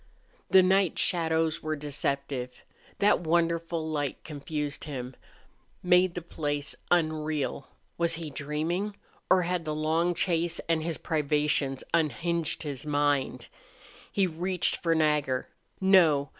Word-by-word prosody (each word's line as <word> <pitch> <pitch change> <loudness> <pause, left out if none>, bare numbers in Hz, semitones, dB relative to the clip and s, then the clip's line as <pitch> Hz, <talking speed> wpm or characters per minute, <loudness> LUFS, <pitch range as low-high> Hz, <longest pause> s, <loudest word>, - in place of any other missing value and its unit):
The 190 -1 +7
night 190 -1 +3
shadows 160 -2 +1
were 155 0 -2
deceptive. 140 -3 -3 0.3
That 205 0 +4
wonderful 165 -1 0
light 145 -3 -3
confused 150 -1 -5
him, 130 -4 -6 0.7
made 180 0 +4
the 175 - -4
place 145 -3 -3
unreal. 155 -4 0 0.3
Was 170 -1 +2
he 160 -2 -6
dreaming? 160 +8 -2 0.3
Or 185 -1 +5
had 175 0 -1
the 155 -1 -3
long 165 +3 +1
chase 170 -1 0
and 165 -1 +1
his 165 0 -3
privations 150 -3 +1
unhinged 170 0 0
his 140 -4 -4
mind? 145 -2 0 0.6
He 195 - +2
reached 180 +1 0
for 165 -1 +1
Nagger. 150 -5 +1 0.3
No! 165 -8 +4
160 Hz, 120 wpm, -28 LUFS, 145-170 Hz, 0.7 s, The